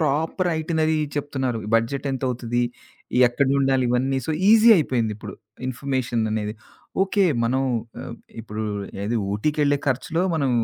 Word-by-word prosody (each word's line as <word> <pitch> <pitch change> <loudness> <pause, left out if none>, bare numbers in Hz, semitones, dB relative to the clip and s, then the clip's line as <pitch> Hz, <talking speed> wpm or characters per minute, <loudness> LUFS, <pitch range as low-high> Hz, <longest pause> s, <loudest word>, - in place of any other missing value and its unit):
Proper 160 +4 0
itinerary 160 0 +1 0.2
చెప్తున్నారు. 135 -4 -2 0.2
Budget 125 +5 +1
ఎంతవుతది? 120 -2 -1 0.6
ఎక్కనుండాలి 135 +1 +2
ఇవన్నీ? 130 +2 +1
So - - -1 0.2
easy 225 +1 +7
అయిపోయింది 120 -9 0
ఇప్పుడు. 110 - -8 0.3
ఇన్ఫమేషన్ 130 -2 -1
అనేది. 105 -1 -2 0.5
ఓకే. 195 0 +2 0.2
మనం 130 +3 +1 0.4
ఆహ్, 120 - -7 0.2
ఇప్పుడు 110 -1 -5 0.4
ఏది 115 +3 0 0.2
ఊటీకెళ్ళే 145 +5 +1
ఖర్చులో 160 +6 0
మనం 140 -4 +1
135 Hz, 120 wpm, -23 LUFS, 120-150 Hz, 0.6 s, easy